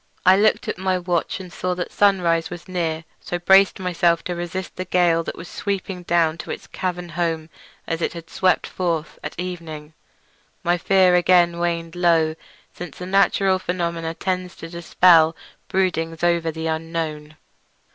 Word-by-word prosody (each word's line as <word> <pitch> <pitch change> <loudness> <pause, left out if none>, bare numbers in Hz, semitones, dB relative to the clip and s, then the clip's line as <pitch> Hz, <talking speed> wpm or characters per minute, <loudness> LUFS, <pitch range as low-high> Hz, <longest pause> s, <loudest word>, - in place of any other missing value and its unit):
I 185 +1 +8
looked 215 +2 +2
at - - -3
my 185 0 +1
watch 175 0 -1
and 185 -2 -10
saw 180 0 -2
that 180 -1 -4
sunrise 170 -5 +2
was 175 +1 -9
near, 165 -3 -2 0.2
so 175 - -4
braced 190 +3 +5
myself 170 -2 +1
to 180 - -3
resist 175 +2 -5
the 185 - -3
gale 175 -2 +2
which - - -5
was 170 - -9
sweeping 195 -2 -4
down 165 -2 +1
to - - -8
its - - -5
cavern 180 -1 -4
home 165 -1 -2 0.3
as 165 0 -3
it - - -1
had 165 -1 -9
swept 185 +2 +1
forth 165 -4 -3
at - - -6
evening. 165 -4 -6 0.7
My 175 +1 +2
fear 190 0 +4
again 175 -1 +4
waned 170 -1 -2
low, 165 -3 +3 0.4
since 175 -5 -9
a 180 - -5
natural 195 0 +3
phenomenon 170 -2 -3
tends 185 0 -3
to 165 - -9
dispel 170 -1 +4 0.3
broodings 165 -3 -1
over 170 -1 +2
the 160 0 -5
unknown. 160 -1 -3
175 Hz, 165 wpm, -22 LUFS, 165-185 Hz, 0.7 s, I